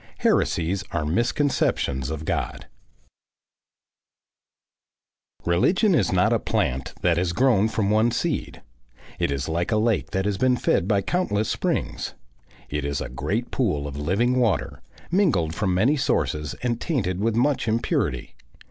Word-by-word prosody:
HERESIES 90 +4 +1
ARE 80 -3 -1
MISCONCEPTIONS 85 - 0
OF 80 0 -5
GOD - - -3 2.8
Religion 180 - +3
is 110 - +2
not - - +3
a - - +2
plant 65 +1 -1
that 85 -2 +2
has 85 -1 0
grown 110 -2 +3
from 110 -2 0
one 110 +2 +4
seed; - - -3 0.6
it - - +1
is 70 +1 -2
like 85 +4 -1
a 110 - +3
lake 110 -1 +1
that 95 0 -1
has 100 -2 -1
been 130 -1 +3
fed 90 - +1
by 100 -2 +2
countless 110 - 0
springs. - - -2 0.5
It 75 0 -3
is 70 -1 -2
a - - -5
great 115 +5 -3
pool 75 - 0
of 70 - -7
living 100 - +1
water, 115 -4 0 0.3
mingled 135 - +2
from 95 +2 -1
many 125 +11 +3
sources 75 - -1
and 120 -2 -1
tainted 100 - -1
with 110 +2 0
much 130 +1 +1
impurity. 110 - -1
100 Hz, 145 wpm, -24 LUFS, 80-120 Hz, 2.8 s, one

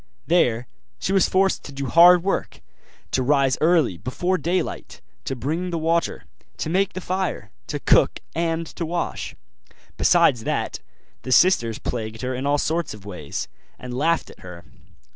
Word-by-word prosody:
There 125 -9 +2 0.3
she 190 - -2
was 195 - +3
forced 190 +1 +2
to - - -8
do 140 0 -5
hard 170 +6 +7
work; 195 - -2 0.5
to 130 - +1
rise 135 0 +3
early 155 - +3
before 175 - -1
daylight, 175 +4 -3 0.3
to 135 - -2
bring 160 +9 -2
the 170 - -2
water, 165 +1 0 0.3
to 155 - -3
make 195 +3 +1
the 185 - -4
fire, 185 +1 -3 0.2
to - - -3
cook - - +3
and 165 0 -1
to - - -2
wash. 170 +1 -3 0.6
Besides 165 -10 +4
that, - - -2 0.4
the 130 - -6
sisters 120 - +4
plagued 110 -1 -5
her 130 +1 -2
in 130 +2 -3
all 145 0 +3
sorts 160 -4 -1
of 100 -2 -15
ways, 90 -8 -5 0.3
and 125 0 -8
laughed 165 +5 0
at - - -18
her. 90 -2 -11
155 Hz, 160 wpm, -23 LUFS, 125-175 Hz, 0.6 s, hard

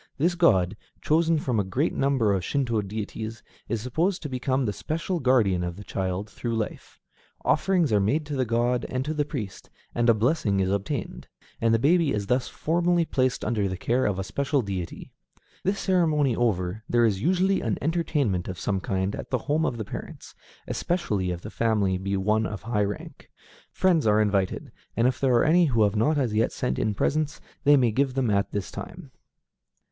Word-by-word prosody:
This 170 +5 +2
god, 100 - +3 0.2
chosen 165 +1 +2
from 125 -7 0
a - - +2
great 130 - -1
number 130 -7 +2
of 95 -2 -1
Shinto 120 - 0
deities, 110 +2 -6 0.3
is 115 -2 -1
supposed 170 - -1
to 150 - -4
become 130 +1 0
the 105 - -1
special 165 - -3
guardian 115 - +3
of 85 -1 -3
the 105 - -9
child 95 +1 -3
through 115 +3 -4
life. 110 -1 -5 0.5
Offerings 180 - +2
are 105 - +5
made 140 +11 +1
to 145 -1 -4
the 130 - +1
god 120 +1 +1
and 130 +1 -2
to 155 - -2
the 150 -1 0
priest, 125 -10 -6 0.2
and 120 0 +2
a 115 - +6
blessing 110 -4 +1
is 95 0 +1
obtained; 100 +6 -3 0.3
and 115 0 +3
the 115 - +4
baby 155 +4 +3
is 100 -1 -2
thus 125 +4 +1
formally 175 +1 +1
placed 130 -4 0
under 105 -3 0
the 95 -1 -4
care 125 +6 +1
of 100 -2 -1
a 95 - -2
special 140 +7 0
deity. 95 -4 -5 0.5
This 195 +2 0
ceremony 155 - +2
over, 105 -3 -1
there 120 -1 +4
is 100 -4 +1
usually 185 - +2
an 110 -3 -1
entertainment 145 - 0
of 95 - -5
some 95 +1 -1
kind 95 +1 -2
at - - -7
the 130 - +1
home 155 +3 +1
of 120 - -3
the 110 - -4
parents, - - -8 0.3
especially 105 - -1
if 90 -1 -4
the 105 - -8
family 105 -5 +1
be 100 +1 -1
one 105 +3 +1
of 105 - -7
high 105 -3 0
rank. 100 -1 -7 0.4
Friends 170 -9 +2
are 105 0 +4
invited, 100 -3 0 0.3
and 115 +2 +4
if 130 -1 -1
there 130 -3 +3
are 120 - +4
any 170 +3 +5
who 115 -7 +2
have 100 0 +1
not 150 +9 +2
as 125 -6 0
yet 110 +2 +2
sent 65 +1 -2
in 105 -1 0
presents, 150 +7 0 0.3
they 145 0 +7
may 125 -4 +3
give 130 +3 0
them 130 -5 +1
at 100 0 +1
this 100 -3 -3
time. 170 -6 -9
120 Hz, 200 wpm, -26 LUFS, 100-145 Hz, 0.5 s, they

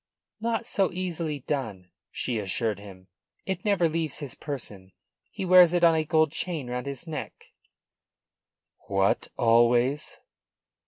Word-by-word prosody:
"Not 230 0 -1
so 200 -5 +1
easily 170 -5 -3
done," 110 -11 -4 0.2
she 120 -3 -3
assured 105 +1 -2
him. 95 -2 -13 0.4
"It 190 +3 -3
never 200 -6 +3
leaves 160 -2 -2
his 145 -5 -6
person. 105 - -7 0.4
He 190 - -5
wears 180 -1 +7
it 175 -1 +1
on 165 -1 +7
a 160 -1 +1
gold 155 -1 +2
chain 155 -8 -3
round 125 +2 -4
his 140 +3 -6
neck." 160 -3 -7 1.4
"What, 95 0 +1
always?" 120 +5 +3
145 Hz, 130 wpm, -27 LUFS, 115-170 Hz, 1.4 s, wears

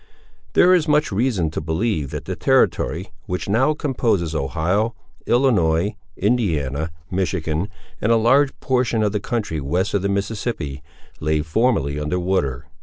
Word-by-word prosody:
There 180 +1 +6
is 170 -3 +3
much 150 -2 +2
reason 100 -6 0
to 80 - -3
believe, 80 - -1
that - - -6
the - - -3
territory - - +1 0.2
which 90 0 -3
now 130 +9 +2
composes 115 - 0
Ohio, 90 - 0 0.3
Illinois, 105 -7 +2 0.2
Indiana, 80 - 0 0.2
Michigan, 90 -2 -1 0.3
and 110 - +2
a - - +6
large 130 +5 +3
portion 125 -4 +1
of 105 - +1
the 105 - -1
country 105 -8 -2
west 90 +9 -1
of 100 - +1
the 100 - -1
Mississippi, 100 - -3 0.4
lay 75 0 0
formerly 80 - +1
under 75 +5 -1
water. 75 -8 -1
100 Hz, 145 wpm, -21 LUFS, 80-120 Hz, 0.4 s, There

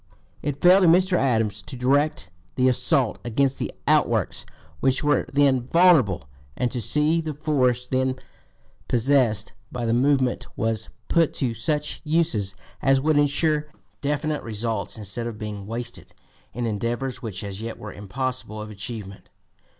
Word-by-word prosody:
It 145 -1 -4
fell 185 +2 +7
to 180 - +5
Mr. 180 +2 +4
Adams 115 - +1
to 140 - -9
direct 130 - +1 0.2
the 125 - 0
(p. 130 - +6
245) - - 0
assault 135 -7 +1
against 135 +3 0
the - - -2 0.2
outworks - - +1 0.3
which 130 0 +1
were 145 0 +2
then 135 -3 +3
vulnerable, 140 - +4 0.3
and 125 -1 0
to 125 - -2
see 150 +7 +2
that 155 -1 -4
the - - -19
force 130 -5 +1
then 130 0 0 0.7
possessed 120 -4 +2 0.2
by 120 -1 -3
the 115 - +1
movement 130 0 +2
was 110 0 -1 0.2
put 165 -3 +2
to 125 -4 0
such 150 +6 -1
uses 150 - 0 0.3
as 135 -1 +4
would 150 +1 +3
insure 150 +1 +1 0.3
definite 150 +1 -1
results 110 -3 -3
instead 110 +3 -4
of 115 -2 -6
being 105 -2 -6
wasted 120 +2 -6 0.4
in 120 0 -3
endeavors 120 +4 -2
which 110 -5 -5
as 100 0 -6
yet 115 0 -5
were 105 - -8
impossible 110 +1 -4
of 105 0 -7
achievement. 100 -1 -7
125 Hz, 160 wpm, -24 LUFS, 110-145 Hz, 0.7 s, fell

